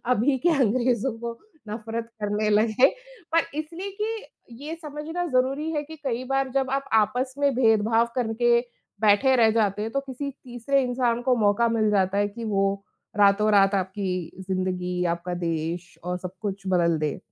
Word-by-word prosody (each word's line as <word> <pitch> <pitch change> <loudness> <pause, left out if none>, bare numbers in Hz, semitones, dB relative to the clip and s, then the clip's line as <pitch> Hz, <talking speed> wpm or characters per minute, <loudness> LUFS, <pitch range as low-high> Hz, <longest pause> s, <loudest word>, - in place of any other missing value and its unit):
अभी 260 +4 +2
के 340 - +2
अंग्रेज़ों 245 +1 +2
को 235 0 -6 0.3
नफ़रत 225 +1 -5
करने 210 +1 0
लगे, 215 +4 +4 0.5
पर 330 - +5 0.2
इसलिए 335 +6 -5
कि 445 +1 -3 0.4
ये 315 +2 -4
समझना 310 +4 -4
ज़रूरी 270 +3 0
है 295 -2 -1
कि 315 +2 -10
कई 250 0 -1
बार 270 +1 0
जब 270 -1 +1
आप 275 0 -2
आपस 250 +4 +2
में 285 -1 +2
भेदभाव 225 -1 +3
करके 235 0 +2 0.4
बैठे 220 +5 +4
रह 225 -2 +5
जाते 210 -2 +1
हैं 220 - -3
तो 275 - 0
किसी 275 +1 -5
तीसरे 265 +1 -1
इंसान 245 -1 0
को 250 0 +2
मौका 215 +1 +3
मिल 220 -2 +1
जाता 195 -1 +2
है 205 0 +2
कि 230 +3 -8
वो 195 -2 +1 0.5
रातों-रात 200 -1 +4
आपकी 190 0 -2 0.4
ज़िंदगी, 180 -1 -1
आपका 170 +1 -2
देश 165 +2 -3
और 180 0 -2
सब 185 0 -6
कुछ 200 -2 -3
बदल 170 -2 +3
दे। 150 -1 -2
230 Hz, 165 wpm, -25 LUFS, 200-265 Hz, 0.5 s, पर